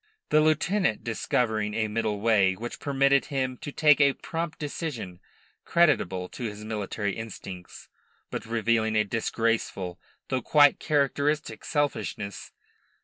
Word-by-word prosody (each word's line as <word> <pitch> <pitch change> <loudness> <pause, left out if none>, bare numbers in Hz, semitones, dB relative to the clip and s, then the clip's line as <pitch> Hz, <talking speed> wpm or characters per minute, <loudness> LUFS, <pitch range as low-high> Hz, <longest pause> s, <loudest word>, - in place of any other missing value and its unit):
The 155 - +5
lieutenant 155 - +1
discovered 110 -2 -1
a 110 -1 +1
middle 105 -1 -2
way 100 -4 +3
which 120 +4 -7
permitted 140 -1 +2
him 130 -3 -2
to 145 - -7
take 150 0 +4
a 140 -1 +5
prompt 165 +2 -4
decision 140 - -5 0.4
creditable 95 - +2
to 120 - -6
his 105 -1 -6
military 105 -2 -3
instincts, 95 -5 -8 0.4
but - - -5
revealing 115 -1 +1
a 110 - +4
disgraceful 110 -4 -1 0.3
though 130 -1 0
quite 145 +3 +5
characteristic 145 -3 0
selfishness. 145 -9 -2
115 Hz, 125 wpm, -27 LUFS, 105-145 Hz, 0.4 s, The